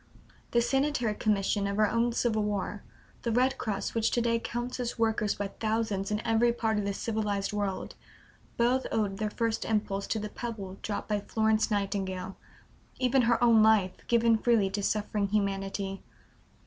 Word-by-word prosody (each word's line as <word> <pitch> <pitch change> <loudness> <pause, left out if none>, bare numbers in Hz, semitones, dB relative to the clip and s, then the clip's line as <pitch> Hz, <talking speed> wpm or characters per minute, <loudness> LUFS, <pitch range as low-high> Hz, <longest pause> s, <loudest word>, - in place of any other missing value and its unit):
The 235 0 +2
Sanitary 270 -4 +1
Commission 205 -1 0
of 200 0 -2
our 215 0 +4
own 230 +3 +1
Civil 230 -2 +1
War, 205 -1 -2 0.4
the 235 - -1
Red 255 +3 +2
Cross 200 -3 -2
which 225 -1 +2
to - - +1
day 230 0 +1
counts 240 +2 -4
its 245 -1 -3
workers 220 -2 +1
by 200 -1 -3
thousands 215 -2 -1
in 210 +1 -2
every 225 +1 +3
part 220 -2 0
of 205 - -2
the 200 - -1
civilized 210 -3 -2
world, 200 -2 -2 0.6
both 245 +2 +2
owed 205 -3 0
their 215 +1 -1
first 230 +1 -1
impulse 205 -2 -1
to - - -1
the 210 0 -4
pebble 205 -5 -6
dropped 205 - -4
by 210 -1 0
Florence 220 +1 +1
Nightingale 195 -2 -2 0.6
even 255 +1 +3
her 235 0 +3
own 230 -2 +6
life, 215 -4 +4 0.2
given 230 -1 +3
freely 220 -5 +2
to 205 - -2
suffering 210 0 0
humanity. 195 -1 -2
215 Hz, 170 wpm, -29 LUFS, 200-230 Hz, 0.6 s, own